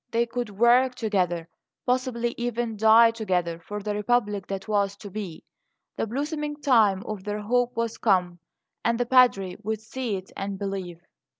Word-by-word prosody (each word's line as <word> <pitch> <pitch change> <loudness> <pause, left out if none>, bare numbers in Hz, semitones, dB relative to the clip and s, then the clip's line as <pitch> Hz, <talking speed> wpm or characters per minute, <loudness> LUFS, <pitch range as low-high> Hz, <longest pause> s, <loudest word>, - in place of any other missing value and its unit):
They 235 0 +1
could 240 -1 -4
work 240 +5 +4
together, 180 -7 -1 0.4
possibly 250 -2 0
even 240 -1 -2
die 220 +2 +6
together, 180 -7 -1
for 205 +4 -7
the 210 0 -2
Republic 210 -2 0
that 195 +1 -5
was 200 -2 +1
to 205 -1 -10
be. 190 -5 -6 0.5
The - - -2
blossoming 295 +5 -3
time 220 -9 +3
of 210 -3 -6
their 210 +1 -3
hope 245 +3 +1
was 230 -1 -2
come, 180 -5 +2 0.4
and 235 0 +1
the 245 - +1
Padre 235 -8 +4
would 220 0 -2
see 225 0 -4
it 190 0 -8
and 195 0 -4
believe. 190 -4 -5
215 Hz, 165 wpm, -26 LUFS, 195-240 Hz, 0.5 s, die